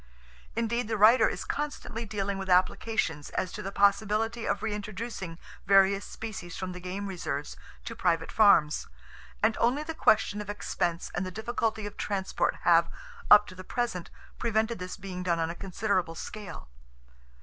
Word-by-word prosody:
Indeed, 230 0 0
the 220 -1 -1
writer 220 +5 +6
is - - -5
constantly 290 -6 -4
dealing 200 -1 -2
with 190 0 -5
applications 180 -3 +1
as 185 - -2
to - - -6
the 195 - -5
possibility 215 +3 +2
of 200 - -1
reintroducing 210 -4 -4 0.3
various 195 0 +5
species 205 -6 -7
from 185 -1 -4
the 180 - -7
game 185 +3 -5
reserves 155 -7 -4 0.3
to - - -5
private 165 -1 0
farms, 170 -8 +4 0.6
and 220 0 +4
only 255 +6 +2
the 325 +1 -5
question 210 -7 +3
of 205 - -8
expense 175 -4 -2
and 175 - -1
the 185 - -3
difficulty 220 +1 -2
of 205 - -7
transport 195 -2 -1
have, - - +5 0.4
up 210 0 +9
to - - -11
the 185 0 -9
present, 185 -5 -3 0.3
prevented 225 0 0
this 180 0 -6
being 185 -2 -6
done 175 -2 +1
on 165 0 0
a - - -5
considerable 185 -3 -1
scale. 205 - -8
200 Hz, 160 wpm, -29 LUFS, 180-220 Hz, 0.6 s, up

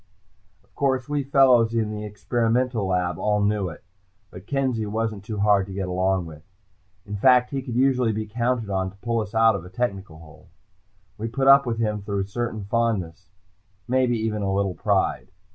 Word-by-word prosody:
Of - - -35
course, 130 -3 0
we 145 -1 -1
fellows 130 -4 +4
in 110 -2 0
the 105 0 -5
experimental 115 +1 -1
lab 90 -1 -1
all 105 0 +1
knew 100 -2 0
it, 80 - -12 0.5
but 90 +2 -12
Kenzie 130 -6 -1
wasn't 110 -1 -3
too 105 +1 -5
hard 100 -2 +3
to 95 - -8
get 95 -2 -3
along 95 0 0
with. 80 -2 -11 0.6
In 105 - -6
fact, 125 +3 +4
he 135 -1 -2
could 125 -3 -6
usually 125 -2 +2
be 110 0 -3
counted 115 0 -2
on 95 -1 -1
to 95 - -17
pull 115 +3 -1
us 110 0 -5
out 115 0 +5
of 95 - -5
a 90 - -11
technical 95 -5 -3
hole. 80 +1 -16 0.7
We 115 - -3
put 135 +3 -1
up 140 -1 +7
with 115 -1 -1
him 105 -2 -1
through 100 0 -2
a - - -2
certain 110 +1 -4
fondness, 100 -5 -2 0.6
maybe 125 -1 +2
even 110 -1 -2
a 100 -1 -1
little 95 -1 0
pride. - - 0
110 Hz, 195 wpm, -24 LUFS, 100-120 Hz, 0.7 s, up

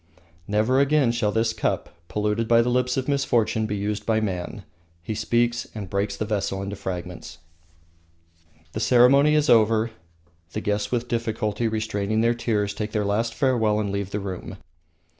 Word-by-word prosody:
"Never 110 +6 +2
again 140 -3 +3
shall 120 -3 0
this 110 +1 +1
cup, 105 - -2
polluted 105 +2 -1
by 115 0 +5
the 120 - 0
lips 125 +1 +1
of 130 - -1
misfortune, 120 -6 +1
be 105 - -2
used 105 +1 -2
by 110 -1 +1
man." 100 0 -4 0.4
He 110 - -3
speaks, 120 +2 0
and 100 -4 -6
breaks 100 0 -1
the 110 - -2
vessel 100 -2 -2
into 100 +1 -5
fragments. 90 -4 -6 1.3
The 110 - -4
ceremony 135 +6 +5
is 150 0 +2
over; 115 -1 +4 0.6
the 110 - -3
guests 105 0 -1
with 120 0 -1
difficulty 115 -1 -1
restraining 110 -1 -1
their 115 +1 +3
tears, 110 -4 -1
take 105 +1 -5
their 105 -2 0
last 115 +3 0
farewell 110 -6 +2
and 100 -2 -2
leave 100 -1 -3
the 105 - -3
room. 95 -2 -6
110 Hz, 165 wpm, -24 LUFS, 105-120 Hz, 1.3 s, by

